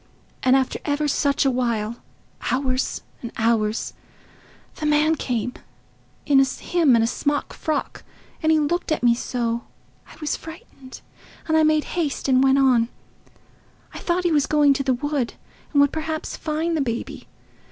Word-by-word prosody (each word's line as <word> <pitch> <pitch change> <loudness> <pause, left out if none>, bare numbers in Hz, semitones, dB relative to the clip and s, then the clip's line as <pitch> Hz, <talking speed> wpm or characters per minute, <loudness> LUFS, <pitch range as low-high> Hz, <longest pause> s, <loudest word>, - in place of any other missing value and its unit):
And 255 +1 +4
after 265 -1 0
ever 295 0 0
such 280 0 +1
a 270 - +4
while—hours 250 +2 -2 0.2
and 235 - -6
hours—the 225 -1 +1 1.0
man 300 +1 +3
came—him 250 -5 -3 0.6
in 270 0 +3
a - - +2
smock 290 +4 -1
frock, 310 -1 -3 0.4
and 315 -1 +3
he 315 - +5
looked 320 +3 0
at 310 - 0
me 240 -1 +6
so, 235 -1 -2 0.5
I - - -14
was 305 -1 -1
frightened, 275 -5 -11 0.5
and 315 - +2
I 315 - +5
made 310 -1 +3
haste 315 -7 -1
and 260 -1 +4
went 270 0 +4
on. 250 -4 +4 1.0
I - - -7
thought 355 +1 0
he 350 - +2
was 295 -3 +2
going 295 -2 +4
to 275 - -2
the 260 -2 +1
wood 285 -1 -2 0.4
and 285 - +2
would 285 0 +5
perhaps 315 0 -3
find 320 +2 -2
the 310 - +1
baby. 235 -3 -4
280 Hz, 150 wpm, -23 LUFS, 250-310 Hz, 1.0 s, me